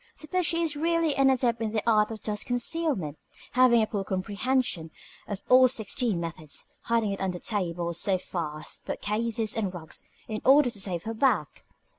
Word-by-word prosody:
Suppose 340 +2 -1
she 335 0 +1
is 310 -3 0
really 330 0 +1
an 275 -1 +4
adept 240 -3 +1
in 220 -1 -2
the 215 -2 0
art 215 -2 +4
of 220 -1 -7
dust 210 -1 -2
concealment, 245 - -1 0.3
having 245 -3 +5
a - - +2
full 205 -2 -3
comprehension 200 -1 -1 0.4
of 205 -1 -5
all 255 0 +7
sixty 235 -2 0
methods 165 -3 -5
hiding 230 -3 +1
it 195 - -4
under 185 -2 -1
tables, 175 -4 -1
sofas, 170 -5 -2
bookcases, 220 +1 -1
and 200 -5 -2
rugs, 160 -2 -7 0.3
in 215 -1 -4
order 270 -2 +6
to 205 - -4
save 180 -4 -2
her 225 - -4
back? 265 +4 0
220 Hz, 170 wpm, -27 LUFS, 190-255 Hz, 0.4 s, all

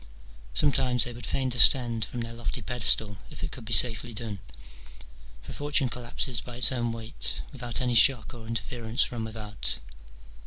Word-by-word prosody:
Sometimes 125 - +2
they 120 - -4
would 120 0 -8
fain 130 -1 -1
descend 120 -1 +5
from 120 - -7
their 115 0 -6
lofty 115 0 -5
pedestal, 110 -4 +1
if - - -10
it - - -5
could - - -8
be 115 - -7
safely 115 +2 +4
done: 105 -3 -5 1.0
for - - -9
Fortune 145 -2 0
collapses 120 0 -1
by 120 +3 -10
its 125 +1 +5
own 120 -2 -2
weight, 115 0 -4
without 120 -4 0
any 125 -1 -1
shock 115 -2 +4
or 115 -2 -11
interference 115 +1 -2
from 120 -2 -5
without. 110 -1 -2
120 Hz, 165 wpm, -26 LUFS, 110-125 Hz, 1.0 s, descend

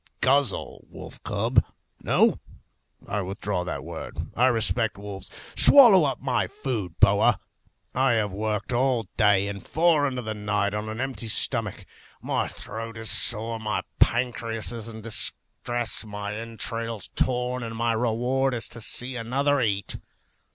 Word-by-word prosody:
Guzzle, 135 -4 +1
wolf - - -11
cub; - - +1 0.4
no, - - +3 0.7
I 100 +1 -1
withdraw 95 0 -3
that 90 - -4
word. - - -7
I 125 +2 +4
respect 115 -2 +1
wolves. 100 -2 -7 0.3
Swallow 225 - +8
up 135 -3 -1
my 130 -3 0
food, 110 - -4
boa. 100 +3 +5 0.5
I 130 0 +3
have 105 -3 0
worked 105 +4 -2
all 125 -1 +2
day, 100 -2 +3
and 100 -1 -6
far 160 -3 +3
into 130 -2 -4
the 110 0 -3
night, 105 -1 -1
on 105 +1 -3
an 110 +1 -5
empty 130 -4 -3
stomach; 110 -1 -1 0.3
my - - -1
throat 115 0 -7
is 110 0 0
sore, 115 +1 +2
my 105 -2 -2 0.2
pancreas 115 -2 +1
in 115 -1 -7
distress, 115 +1 -3
my 105 -1 -5
entrails 115 -1 -3
torn; 125 0 0
and 115 -1 -5
my 115 +1 +1
reward 125 +3 0
is 115 - -4
to 115 - -7
see 125 +3 -4
another 135 +4 +1
eat. 100 -4 -1
115 Hz, 145 wpm, -25 LUFS, 105-125 Hz, 0.7 s, Swallow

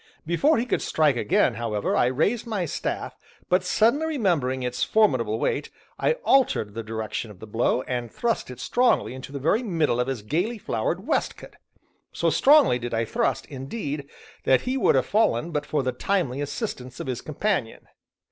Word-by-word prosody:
Before 175 - +3
he 230 - 0
could 245 - 0
strike 150 -4 +2
again, 170 - +2
however, 110 -2 -2
I 120 - +3
raised 200 - 0
my 205 -6 -1
staff, 155 - -4 0.3
but 180 0 +3
suddenly 230 +11 +2
remembering 170 - 0
its 125 0 -1
formidable 130 - +2
weight, - - -1 0.3
I - - +3
altered 250 - +3
the 115 - -4
direction 110 0 -4
of 100 -4 -13
the - - -9
blow, 115 +3 0
and 120 -2 -4
thrust 235 - -1
it 125 -1 -9
strongly 245 - +2
into 130 +1 -9
the 140 - -5
very 160 - +1
middle 165 - 0
of 125 - +1
his 130 -6 -3
gayly 180 - -1
flowered - - -2
waistcoat. - - -2 0.6
So - - +1
strongly 285 - +5
did 120 -1 -3
I 115 +1 0
thrust, - - -1
indeed, 140 - -5 0.4
that 130 - +4
he 255 +1 -2
would 265 - +3
have 130 - +2
fallen 170 - +1
but 150 -2 -2
for 150 -3 0
the 130 - 0
timely 140 -1 -1
assistance 135 - -5
of - - -4
his 125 -2 -3
companion. 155 - -2
140 Hz, 180 wpm, -25 LUFS, -, 0.6 s, strongly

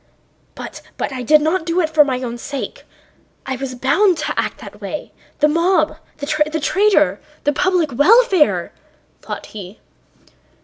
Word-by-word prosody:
"But - - -8 0.2
I 260 -2 -3
did 300 +5 +4
not 325 +3 +1
do 335 +2 0
it 330 - +2
for 310 -1 +6
my 260 -2 -2
own 240 -1 -5
sake. 280 +2 -6 0.6
I 265 - -2
was 260 0 -5
bound 335 +9 +3
to - - -2
act - - -2
that - - -12
way.... - - -6 0.3
The 300 - +6
mob, 330 0 +2 0.2
the 285 - -5 0.3
traitor... 400 +6 +2 0.2
the 290 - +2
public 360 -1 +1
welfare," 375 - +4 0.5
thought - - -6
he. 200 0 -9
305 Hz, 145 wpm, -19 LUFS, 265-360 Hz, 0.6 s, for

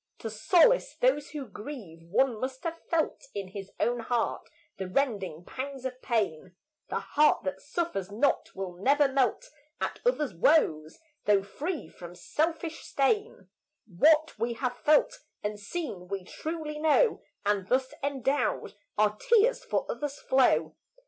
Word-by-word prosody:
To 225 - -5
solace 350 - +4
those - - +2
who 295 -3 -5
grieve 210 - -9
one 225 +7 +1
must 260 +1 -4
have 335 0 -3
felt 325 -2 0
In 195 -2 -4
his 195 0 -7
own 240 0 +1
heart 235 0 -1 0.3
the 190 - -4
rending 190 - -1
pangs 270 0 -6
of 255 0 -5
pain; 185 -6 -1 0.3
The - - -1
heart 300 +1 +3
that 280 - -3
suffers 290 - -3
not 235 +7 +1
will 190 -2 -4
never 275 +10 +3
melt 265 -1 0 0.3
At - - -3
others' 305 - +1
woes, 165 - +3 0.3
though 200 -2 +4
free 300 - -4
from 175 0 -11
selfish 325 - -2
stain; 280 - 0 0.4
What 305 - +4
we 235 +1 0
have 250 +1 -2
felt 320 +11 +3 0.2
and 210 0 -3
seen 205 - -5
we 195 0 -4
truly 310 - -5
know, 320 +10 +3 0.2
And 200 -2 +1
thus 260 +2 +1
endowed, 280 0 0 0.2
our 210 0 +3
tears 470 - +3
for - - -1
others 290 -1 -4
flow. 165 - +3
260 Hz, 145 wpm, -29 LUFS, 200-300 Hz, 0.4 s, solace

